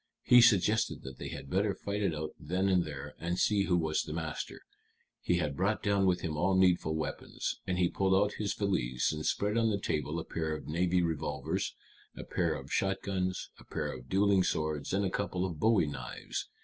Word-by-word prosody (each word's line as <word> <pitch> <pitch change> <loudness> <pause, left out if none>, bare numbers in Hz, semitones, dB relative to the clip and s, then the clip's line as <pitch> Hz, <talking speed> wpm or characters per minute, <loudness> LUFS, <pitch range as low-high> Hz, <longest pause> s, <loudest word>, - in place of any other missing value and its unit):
He 125 0 +8
suggested 110 -1 +3
that 65 -1 -9
they - - -5
had 70 - -7
better 100 +5 +1
fight 100 +2 -3
it 95 -6 +1
out 75 0 -4
then 90 +5 0
and 90 -2 +3
there, 70 -1 -7
and 85 +1 -2
see 100 -1 +3
who 90 - +2
was 80 -1 0
master. 80 0 -4 0.6
He 90 - +1
had 75 -5 -1
brought 95 +3 0
down 100 -1 +3
with 90 -1 +2
him 80 -2 -3
all 95 +5 +2
needful 90 -4 +3
weapons. 80 - -3
And 90 - 0
he 90 -1 +3
pulled 95 +1 +1
out 100 +2 +3
his 105 -2 -1
valise, 65 -12 0
and 75 0 -4
spread 105 +7 +1
on 115 -1 +3
the 105 - +1
table 80 -2 -2
a - - -5
pair 80 -1 -2
of - - -8
navy 90 +3 +1
revolvers, 80 -3 -2 0.4
a - - -5
pair - - 0
of - - -7
shotguns, 95 -1 -1
a - - -13
pair - - -3
of 65 -1 -11
dueling 100 0 +4
swords, 75 -4 -1
and 100 +1 +1
a 95 - -1
couple 95 -2 -1
of 85 -5 -5
bowie 110 -3 +4
knives. 75 -1 -5
90 Hz, 205 wpm, -31 LUFS, 80-100 Hz, 0.6 s, He